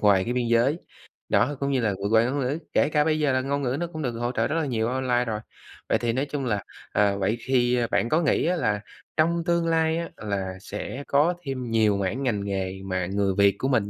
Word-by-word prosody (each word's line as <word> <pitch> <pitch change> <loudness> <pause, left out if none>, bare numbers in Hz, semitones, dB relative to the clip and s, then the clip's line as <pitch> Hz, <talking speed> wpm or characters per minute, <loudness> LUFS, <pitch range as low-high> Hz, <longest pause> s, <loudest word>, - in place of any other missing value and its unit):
ngoài 100 -3 +4
cái 120 - -2
biên 125 -1 0
giới, 120 +7 +3 0.5
đó, 145 +5 +2
cũng 140 0 -1
như 130 -2 +1
là 105 -3 +1
vượt 100 - 0
qua 110 0 +5
ngôn 135 +4 -1
ngữ, 135 +3 -1 0.2
kể - - +3
cả 150 -1 +3
bây 155 -1 +1
giờ 150 -2 +2
là 130 - +2
ngôn 140 +2 -1
ngữ 130 0 -1
nó 175 - -1
cũng 160 -2 -7
được 125 -5 -1
hỗ 120 +1 -2
trợ 115 -2 0
rất 155 - -2
là 165 -2 +1
nhiều 115 -4 0
online 125 -1 +1
rồi. 110 -2 -2 0.5
Vậy - - +3
thì 115 -1 -1
nói 130 +4 0
chung 140 -2 -4
là, 105 -5 -1 0.3
ờ, 100 -1 +2
vậy 100 +4 0
thì 125 0 +2
bạn 115 - +1
có 160 +5 +3
nghĩ 160 - +2
á 175 +2 +2
là 105 -11 0 0.4
trong 170 +2 +2
tương 170 -1 +1
lai 160 0 +2
á 170 0 -3
là 95 -3 -3
sẽ 115 +8 -6
có 150 +5 +3
thêm 130 -5 -4
nhiều 110 -3 +3
mảng 100 +8 -2
ngành 105 -6 0
nghề 95 -1 -3
mà 95 -2 -1
người 100 +1 0
Việt 100 -1 +5
của 130 - 0
mình 110 -7 +1
125 Hz, 255 wpm, -25 LUFS, 105-145 Hz, 0.5 s, qua